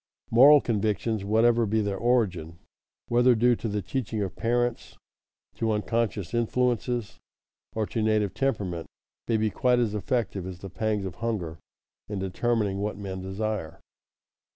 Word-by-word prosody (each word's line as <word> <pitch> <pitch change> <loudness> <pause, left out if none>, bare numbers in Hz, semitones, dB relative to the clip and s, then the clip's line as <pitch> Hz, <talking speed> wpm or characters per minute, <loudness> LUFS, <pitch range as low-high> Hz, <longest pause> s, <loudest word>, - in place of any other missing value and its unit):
Moral 140 +5 +8
convictions, 110 -1 -1
whatever 115 +2 +3
be 110 +2 +1
their 100 -2 -1
origin, 95 -8 0 0.5
whether 120 +1 +5
due 120 +2 +4
to - - -4
the 105 -2 -2
teaching 110 +2 -3
of 95 - -5
parents, 120 +1 -1 0.6
to 115 -1 -1
unconscious 110 -2 -1
influences, 120 -1 0 0.6
or 110 -1 0
to 110 - -3
native 105 -3 +1
temperament, 100 -11 -2 0.4
may 115 - +2
be 110 0 0
quite 125 -2 +2
as 115 -4 +1
effective 105 -4 -2
as 95 -2 -7
the 95 +1 -9
pangs 105 -1 -1
of 90 -3 -6
hunger 95 -9 -3 0.5
in 105 - -3
determining 100 +1 -1
what 105 0 -2
men 95 -2 -5
desire. 95 -3 -4
110 Hz, 145 wpm, -27 LUFS, 100-120 Hz, 0.6 s, Moral